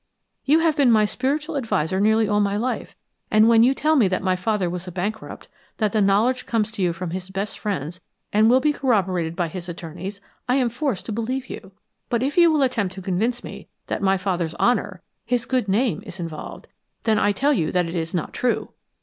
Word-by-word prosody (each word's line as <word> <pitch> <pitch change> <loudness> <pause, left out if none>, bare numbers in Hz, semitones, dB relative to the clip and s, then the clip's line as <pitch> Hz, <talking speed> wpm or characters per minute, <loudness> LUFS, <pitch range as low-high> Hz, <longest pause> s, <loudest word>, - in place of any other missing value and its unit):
You 310 +4 +4
have 325 -2 +2
been 280 -5 +4
my 215 -2 +5
spiritual 290 +8 -2
adviser 190 - 0
nearly 220 +1 +3
all 210 0 +2
my 200 0 +1
life, 250 +4 -3 0.3
and 215 +1 +5
when 230 -1 +6
you 255 +3 +4
tell 310 +3 +2
me 240 -9 +5
that 185 -1 -1
my 185 -1 +2
father 195 0 0
was 180 +1 -5
a - - -5
bankrupt, 200 +5 -5 0.3
that 215 -3 +1
the 215 - +1
knowledge 210 +6 +2
comes 220 -2 0
to 215 - -6
you 180 -2 +2
from 170 0 -5
his 185 +1 -5
best 195 +2 -4
friends 180 -4 -4 0.3
and 215 +2 +5
will 255 +2 +5
be 300 +2 +2
corroborated 185 - 0
by 175 -1 0
his 175 +1 -7
attorneys, 175 +4 -7 0.3
I 250 - +4
am 250 -3 +1
forced 250 - -2
to - - -5
believe 245 +4 -3
you. 190 - -9 0.4
But 235 0 0
if 280 +2 -1
you 335 -3 +5
attempt 225 -8 -1
to 190 - -7
convince 220 +7 -1
me - - -9 0.2
that - - -3
my 195 -1 +3
father's 180 -3 -2
honor 200 -6 0 0.2
his 245 -1 -1
good 255 -5 0
name 210 +2 +1
is 190 -4 -10
involved, 165 -3 -7 0.4
then 220 -2 +2
I 205 - +3
tell 280 +9 +2
you 165 - 0
that 180 -1 +1
it 165 - -5
is 165 0 -3
not 170 - -3
true! 250 -2 -1
210 Hz, 220 wpm, -23 LUFS, 185-245 Hz, 0.4 s, when